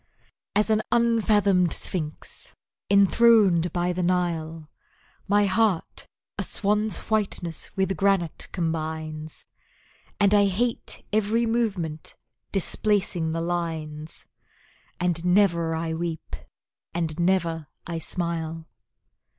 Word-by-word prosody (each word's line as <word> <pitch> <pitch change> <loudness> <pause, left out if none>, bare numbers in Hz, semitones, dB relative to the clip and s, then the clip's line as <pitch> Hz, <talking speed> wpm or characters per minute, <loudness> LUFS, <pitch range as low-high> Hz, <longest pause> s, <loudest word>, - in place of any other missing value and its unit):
As 210 +2 +2
an 215 0 +3
unfathomed 210 -6 +3
sphinx, 155 -4 -3 0.3
enthroned 200 -3 +5
by 175 0 0
the 180 - -2
Nile, 165 -3 -1 0.6
My 205 +1 +4
heart 195 -2 0 0.3
a - - 0
swan's 210 +1 +1
whiteness 195 -6 -2
with 190 0 +1
granite 195 -4 +1
combines, 160 -2 -4 0.7
And 205 -1 +4
I 205 -1 +5
hate 230 +5 -2
every 220 +2 +2
movement, 195 -10 -2 0.4
displacing 195 -3 0
the 165 +1 -2
lines, 160 -3 -4 0.7
And 175 -2 0
never 175 -3 +3
I 160 0 -2
weep 165 -1 -4 0.6
and 165 -1 -2
never 170 -3 +1 0.2
I 170 -1 -4
smile. 165 -2 -3
175 Hz, 100 wpm, -25 LUFS, 165-205 Hz, 0.7 s, enthroned